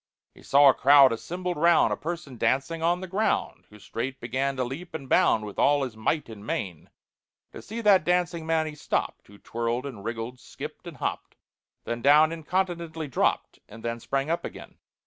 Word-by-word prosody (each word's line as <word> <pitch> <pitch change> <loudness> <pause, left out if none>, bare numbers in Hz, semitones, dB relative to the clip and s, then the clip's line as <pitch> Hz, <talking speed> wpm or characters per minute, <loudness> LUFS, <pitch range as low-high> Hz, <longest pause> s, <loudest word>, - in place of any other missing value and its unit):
He - - -18
saw 140 +1 +5
a - - +5
crowd 140 -2 +6
assembled 180 +8 -4
round 170 +1 +4
A - - -1
person 160 -4 -6
dancing 135 +7 0
on 175 +2 +1
the 185 - -6
ground, 200 +5 -1
Who 105 - -15
straight 125 +5 -5
began 130 +3 -2
to 130 - -1
leap 140 +9 -7
and 140 -4 -6
bound 110 -3 +3
With 105 - -8
all 145 0 +3
his 125 -4 -5
might 130 +8 -1
and 110 -3 -10
main. 90 -6 -4 0.6
To - - -10
see 225 +3 -6
that 200 -6 +5
dancing 175 -1 0
man 160 -1 +1
he 155 - -5
stopped, 150 - -3
Who 100 - -16
twirled 115 +4 -3
and 120 -8 -8
wriggled, 115 +3 -5
skipped - - -9
and - - -9
hopped, - - -4 0.5
Then 120 0 -4
down 150 +4 +6
incontinently 165 -1 -3
dropped, 125 - 0
And 115 +2 -11
then 115 0 -2
sprang 135 +5 -2
up 170 - -1
again. - - -10
140 Hz, 190 wpm, -26 LUFS, 120-170 Hz, 0.6 s, crowd